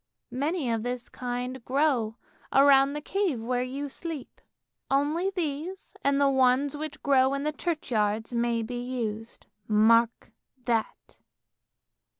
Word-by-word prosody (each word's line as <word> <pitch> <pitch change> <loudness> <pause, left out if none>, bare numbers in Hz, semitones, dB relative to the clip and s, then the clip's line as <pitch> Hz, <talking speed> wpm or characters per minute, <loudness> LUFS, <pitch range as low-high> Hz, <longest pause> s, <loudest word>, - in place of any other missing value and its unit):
Many 285 0 -1
of 225 -1 0
this 245 +1 -4
kind 250 0 -4
grow 255 -5 +1 0.4
round 275 0 +5
the 295 - -4
cave 365 - -1
where 245 +2 -1
you 270 +3 -4
sleep; 310 0 -7 0.5
only 295 +7 +1
these 350 +1 -4
and 280 0 +2
the 280 - +4
ones 265 +1 +3
which 305 0 -6
grow 270 -1 +4
in 275 - -3
the 305 - 0
churchyards 225 -10 -1
may 235 -1 0
be 245 +2 -4
used. 225 -3 -5 0.2
Mark 225 +2 +3 0.3
that! 230 -2 -2
260 Hz, 130 wpm, -27 LUFS, 235-290 Hz, 0.5 s, round